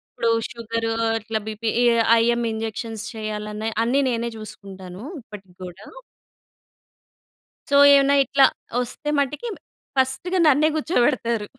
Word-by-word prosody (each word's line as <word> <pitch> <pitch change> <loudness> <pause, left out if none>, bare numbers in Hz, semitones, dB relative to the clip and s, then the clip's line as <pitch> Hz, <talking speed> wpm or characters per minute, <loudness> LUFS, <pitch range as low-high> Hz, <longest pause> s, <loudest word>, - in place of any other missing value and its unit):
ఇప్పుడూ 230 - 0 0.2
షుగరూ 230 0 -3 0.3
అట్లా 220 0 -3
బీపీ 220 +1 -3
ఏ - - +4 0.4
IIM 235 +1 +1
injections 220 0 -5
చెయ్యాలన్నా 215 0 -5 0.2
అన్నీ 250 +4 +1
నేనే 235 0 -2
చూసుకుంటాను 195 -3 -10 0.2
ఇప్పటికి 200 -5 -13
గూడా. 180 +3 -10 1.8
సో, 285 - +2 0.2
ఏమన్నా 280 0 +5
ఇట్లా 275 +1 +5 0.4
ఒస్తే 295 +5 -4
మటికి 295 - -2 0.5
ఫస్ట్‌గా 265 +8 +1
నన్నే 305 +2 +4
కూర్చోపెడతారు. 240 - 0
230 Hz, 110 wpm, -22 LUFS, 215-265 Hz, 1.8 s, ఏమన్నా